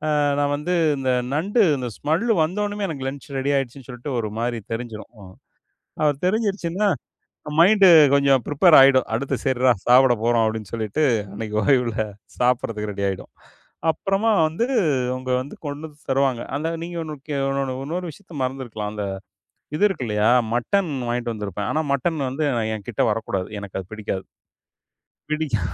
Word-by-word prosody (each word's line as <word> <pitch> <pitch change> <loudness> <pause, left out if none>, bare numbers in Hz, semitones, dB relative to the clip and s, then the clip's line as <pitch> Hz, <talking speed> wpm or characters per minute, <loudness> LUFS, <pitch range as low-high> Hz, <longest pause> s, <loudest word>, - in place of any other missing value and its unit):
அ - - +2 0.2
நா 145 - +2
வந்து 150 +5 -2 0.2
இந்த 130 -1 0 0.2
நண்டு 205 +9 +2
அந்த 125 -2 -4
ஸ்மெல் 160 +10 0 0.2
வந்த 180 +6 -2
ஒன்னமே, 205 -1 -3
எனக்கு 135 -4 -4
லஞ்ச் 140 0 -10
ரெடி 140 +2 0
ஆயிடுச்சுன்னு 135 0 -5
சொல்ட்டு 125 +2 -5
ஒரு 110 -2 -2
மாதிரி 120 0 -1
தெரிஞ்சிரும். 115 -1 -6
ம். 95 - -14 0.7
அது 145 -2 +2
தெரிஞ்சிருச்சுன்னா, 200 -2 0 0.7
மைண்டு 195 +3 +6 0.3
கொஞ்சம் 140 -2 +4
ப்ரிப்பேர் 155 +3 +5
ஆயிடும். 135 -1 +6
"அடுத்து 130 +4 -1
சரிறா, 130 -1 +3
சாப்பிட 125 0 +6
போறோம்." 115 -1 +3
அப்படீன்னு 110 -3 -3
சொல்லிட்டு, 110 +6 -1 0.3
அன்னைக்கு 105 0 -5
ஓய்வுல 125 -5 +2 0.4
சாப்பிடறதுக்கு 115 -4 0
ரெடி 100 0 -4
ஆயிடும். 95 - -6 0.6
அப்புறமா 195 +7 0 0.2
வந்து 170 +10 -1 0.5
அவங்க 130 0 -4
வந்து 140 - -9
கொண்டு 145 +2 -5
வந்து 150 -1 -19
தருவாங்க. 135 -3 +1
அந்த 155 +3 -2 0.2
நீங்க 175 0 -7
ஒண்ணுக்கு 150 -1 -7
இன்னொன்னு 135 -1 -1
இன்னொரு 175 +5 -4
விஷயத்த 175 0 -15
மறந்து 130 +1 -3
இருக்கலாம். 105 -2 -5
அந்த 105 - -4 0.7
இது 200 - -3
இருக்குல்லையா? 110 - 0 0.3
மட்டன் 175 +8 +1 0.2
வாங்கிட்டு 120 -1 -1
வந்திருப்பேன். 105 0 -4
ஆனா 155 - +1
மட்டன் 150 +3 0
வந்து 150 +4 -2 0.3
என்கிட்ட 105 +1 -2
வரக் 110 +1 -2
கூடாது. 95 -1 -2
எனக்கு 100 -1 -6
அது 90 - -11
பிடிக்காது. 105 -3 -4 1.0
பிடிக்கா 155 -8 -1
135 Hz, 155 wpm, -22 LUFS, 115-155 Hz, 1.0 s, மைண்டு